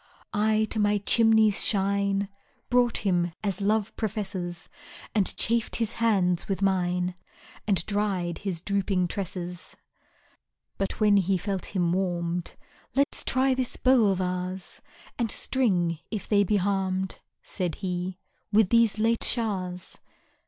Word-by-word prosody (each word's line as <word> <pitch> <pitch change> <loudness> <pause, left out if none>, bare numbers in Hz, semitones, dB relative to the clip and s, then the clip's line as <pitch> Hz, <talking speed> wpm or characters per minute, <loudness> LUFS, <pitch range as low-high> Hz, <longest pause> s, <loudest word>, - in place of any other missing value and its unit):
I 215 +1 +2
to 220 - -1
my 205 0 +3
chimney's 220 0 +4
shine 200 0 +1 0.4
Brought 245 -3 +2
him, 175 -3 +1
as 200 -1 -2
Love 210 +1 0
professes, 195 -5 -4 0.5
And 205 -4 +2
chafed 230 0 +1
his 225 -2 0
hands 185 -6 +2
with 195 0 -2
mine, 180 -1 +1 0.5
And 190 -5 +2
dried 195 -5 -1
his 180 -4 -4
drooping 195 -3 0
tresses. 180 -2 -5 1.0
But 195 +3 -2
when 210 -2 +5
he 190 0 +2
felt 195 +1 -4
him 175 -2 +2
warm'd: 175 -2 -2 0.4
Let's 280 +1 +1
try 260 +1 +2
this 255 -1 -1
bow 255 -4 +4
of 190 -2 +1
ours, 180 0 -4 0.4
And 235 -2 0
string, 180 - 0
if 210 -4 -5
they 205 -1 +4
be 205 +2 +1
harm'd, 190 -1 -1 0.2
Said 175 -4 -3
he, 180 -1 -3 0.3
with 210 -2 +4
these 230 -2 +4
late 225 +1 +2
showers. 185 -6 -1
195 Hz, 130 wpm, -27 LUFS, 180-215 Hz, 1.0 s, when